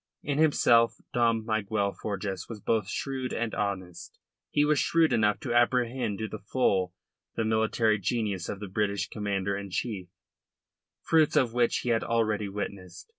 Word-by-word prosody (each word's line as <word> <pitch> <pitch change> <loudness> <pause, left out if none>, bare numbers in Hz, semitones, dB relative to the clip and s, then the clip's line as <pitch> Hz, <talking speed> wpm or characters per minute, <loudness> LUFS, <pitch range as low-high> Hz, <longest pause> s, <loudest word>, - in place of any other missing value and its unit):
In 145 0 -1
himself 115 -7 +4 0.2
Dom 115 -2 +2
Miguel 105 -2 0
Forjas 100 -3 -4
was 115 -3 -7
both 105 -1 0
shrewd 130 +1 -3
and 115 -1 -2
honest. 95 -4 -4 0.3
He 145 - +2
was 150 -1 +3
shrewd 165 -1 +3
enough 105 -2 +2
to 120 - -2
apprehend 120 -2 +1
to 110 - -3
the 110 - -7
full 95 -4 0 0.4
the 115 - 0
military 110 0 +2
genius 100 -3 -2
of 100 - -4
the 105 - -6
British 100 0 -1
Commander 100 -2 -2
in 100 0 -6
Chief, 95 -1 -3 1.0
fruits 160 -2 +3
of 120 -4 +3
which 120 -1 +2
he 125 - -2
had 115 -1 +2
already 110 -3 0
witnessed. 100 - -6
110 Hz, 160 wpm, -28 LUFS, 100-120 Hz, 1.0 s, himself